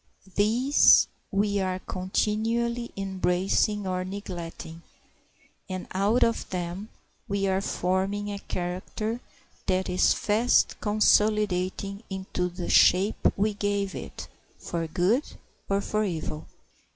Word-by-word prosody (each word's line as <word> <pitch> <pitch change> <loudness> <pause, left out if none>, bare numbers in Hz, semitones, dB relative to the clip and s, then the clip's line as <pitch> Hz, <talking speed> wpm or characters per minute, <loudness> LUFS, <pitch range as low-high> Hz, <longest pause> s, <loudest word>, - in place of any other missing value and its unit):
These 240 +7 +5 0.2
we 200 0 +1
are 185 -1 -1
continually 225 +6 -1
embracing 195 +2 0
or 185 -1 -1
neglecting, 175 -4 -7 0.9
and 185 -1 -4
out 205 +6 +2
of 230 - 0
them 180 +3 -4 0.4
we 200 -2 0
are 190 0 +1
forming 195 +3 -1
a 200 - -5
character 190 +6 -4 0.5
that 185 0 +1
is 180 - +3
fast 220 +4 +2
consolidating 210 -2 +2
into 190 -2 -3
the 175 0 -6
shape 190 +4 +4
we 210 +2 +1
gave 200 -1 -1
it - - -7 0.3
for 165 -1 -4
good 185 - +2 0.5
or 200 0 +2
for 215 +1 -1
evil. 160 -5 -4
195 Hz, 110 wpm, -27 LUFS, 185-210 Hz, 0.9 s, These